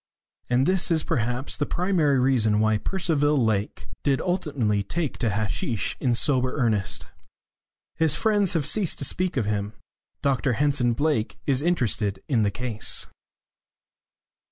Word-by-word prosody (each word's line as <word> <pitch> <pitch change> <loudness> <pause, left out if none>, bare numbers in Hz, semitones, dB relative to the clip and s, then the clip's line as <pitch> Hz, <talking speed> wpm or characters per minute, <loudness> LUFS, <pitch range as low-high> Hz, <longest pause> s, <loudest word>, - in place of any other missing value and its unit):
And 125 +2 +3
this 185 +1 +2
is 160 -2 +2
perhaps 125 +3 -2
the 145 - -2
primary 170 -6 +1
reason 115 -5 +2
why 110 -1 +2
Percival 150 - +1
Lake 110 -5 -1
did 140 -2 +1
ultimately 145 - 0
take 150 - -3
to 115 - +1
hasheesh 105 +1 -2
in 125 -3 +1
sober 130 0 +1
earnest. 110 -7 -1 0.9
His 160 -2 +2
friends 205 -4 +2
have 160 -5 0
ceased 185 +3 +2
to 140 - -2
speak 180 +2 -1
of 115 - +1
him. 105 0 -2 0.5
Dr 135 -2 +1
Henson 135 -2 +1
Blake 145 -3 -1
is 135 -2 +2
interested 115 - 0
in 120 -6 +2
the 105 - +2
case. 115 0 -2
130 Hz, 140 wpm, -25 LUFS, 110-155 Hz, 0.9 s, And